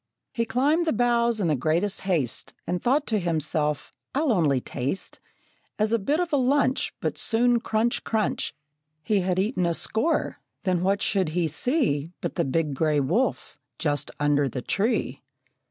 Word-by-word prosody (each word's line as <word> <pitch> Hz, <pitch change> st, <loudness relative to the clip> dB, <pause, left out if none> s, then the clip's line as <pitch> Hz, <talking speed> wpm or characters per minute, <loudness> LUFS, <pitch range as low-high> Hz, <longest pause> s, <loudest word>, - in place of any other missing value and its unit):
He 230 Hz, -, 0 dB
climbed 285 Hz, +9 st, +1 dB
the -, -, +2 dB
boughs 235 Hz, -1 st, +2 dB
in 190 Hz, -, +1 dB
the 155 Hz, -, +2 dB
greatest 165 Hz, +9 st, 0 dB
haste, 165 Hz, -, -1 dB
And 180 Hz, -, -2 dB
thought 280 Hz, +4 st, +2 dB
to 215 Hz, -2 st, +1 dB
himself, 155 Hz, -3 st, -1 dB, 0.2 s
"I'll 290 Hz, -1 st, +2 dB
only 155 Hz, -, +3 dB
taste, 135 Hz, +8 st, -4 dB, 0.6 s
As 215 Hz, +1 st, +1 dB
a 230 Hz, -, +3 dB
bit 285 Hz, -, 0 dB
of 350 Hz, -3 st, -2 dB
a -, -, +5 dB
lunch." 270 Hz, +1 st, +2 dB
But -, -, -2 dB
soon, 240 Hz, +1 st, +3 dB
crunch, 225 Hz, +1 st, 0 dB
crunch, 220 Hz, -1 st, -1 dB, 0.5 s
He 210 Hz, -3 st, +2 dB
had 185 Hz, -1 st, 0 dB
eaten 195 Hz, 0 st, 0 dB
a 170 Hz, -, 0 dB
score 255 Hz, -, 0 dB, 0.3 s
then 180 Hz, -3 st, +1 dB
what 195 Hz, +2 st, +1 dB
should 190 Hz, -5 st, +1 dB
he 170 Hz, -2 st, +2 dB
see 160 Hz, -, 0 dB
But -, -, -3 dB
the 170 Hz, -, 0 dB
big 150 Hz, +2 st, 0 dB
gray 150 Hz, +1 st, +1 dB
wolf 180 Hz, -, 0 dB, 0.2 s
just 145 Hz, -3 st, -1 dB
under 145 Hz, -1 st, +2 dB
the 125 Hz, +1 st, -5 dB
tree! 220 Hz, +5 st, -1 dB
195 Hz, 170 wpm, -25 LUFS, 155-240 Hz, 0.6 s, a